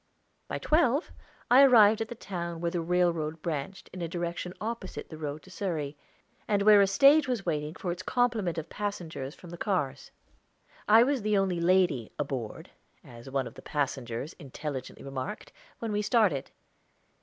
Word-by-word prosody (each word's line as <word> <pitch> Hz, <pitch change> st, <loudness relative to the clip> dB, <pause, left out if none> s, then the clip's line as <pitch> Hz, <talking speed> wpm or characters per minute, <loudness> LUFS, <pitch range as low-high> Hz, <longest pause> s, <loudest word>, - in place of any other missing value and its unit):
By -, -, -3 dB
twelve 305 Hz, -1 st, +2 dB, 0.4 s
I 255 Hz, +2 st, +9 dB
arrived 225 Hz, -5 st, +7 dB
at 225 Hz, -, -1 dB
the 240 Hz, -, -7 dB
town 170 Hz, -6 st, -5 dB
where 170 Hz, 0 st, -1 dB
the 175 Hz, -, -1 dB
railroad 165 Hz, -2 st, 0 dB
branched 170 Hz, +3 st, -4 dB
in 180 Hz, -, -7 dB
a 170 Hz, -, -1 dB
direction 175 Hz, +1 st, -4 dB
opposite 220 Hz, -3 st, -5 dB
the 155 Hz, -, -8 dB
road 150 Hz, 0 st, -5 dB
to 185 Hz, -, -15 dB
Surrey, 160 Hz, -7 st, -3 dB, 0.5 s
and 205 Hz, -1 st, +2 dB
where 210 Hz, -1 st, +8 dB
a 200 Hz, -, +5 dB
stage 275 Hz, +9 st, +6 dB
was 245 Hz, -6 st, -2 dB
waiting 150 Hz, -1 st, -2 dB
for 180 Hz, -, -3 dB
its 175 Hz, +1 st, -5 dB
complement 225 Hz, -7 st, 0 dB
of 160 Hz, 0 st, -4 dB
passengers 170 Hz, -10 st, -5 dB
from 175 Hz, -, -13 dB
the 175 Hz, -, -9 dB
cars. 145 Hz, -10 st, -1 dB, 0.8 s
I 225 Hz, +2 st, +8 dB
was 270 Hz, -1 st, +1 dB
the 210 Hz, 0 st, +1 dB
only 190 Hz, -3 st, +1 dB
lady 170 Hz, -, +2 dB
"aboard," 130 Hz, -6 st, -4 dB, 0.3 s
as 120 Hz, +2 st, -12 dB
one 135 Hz, -1 st, -1 dB
of -, -, -8 dB
the -, -, -12 dB
passengers 135 Hz, -1 st, -3 dB
intelligently 140 Hz, -3 st, -6 dB
remarked, 135 Hz, +10 st, -5 dB, 0.3 s
when 225 Hz, -2 st, -4 dB
we 210 Hz, 0 st, 0 dB
started. 205 Hz, -, +2 dB
175 Hz, 170 wpm, -29 LUFS, 150-210 Hz, 0.8 s, I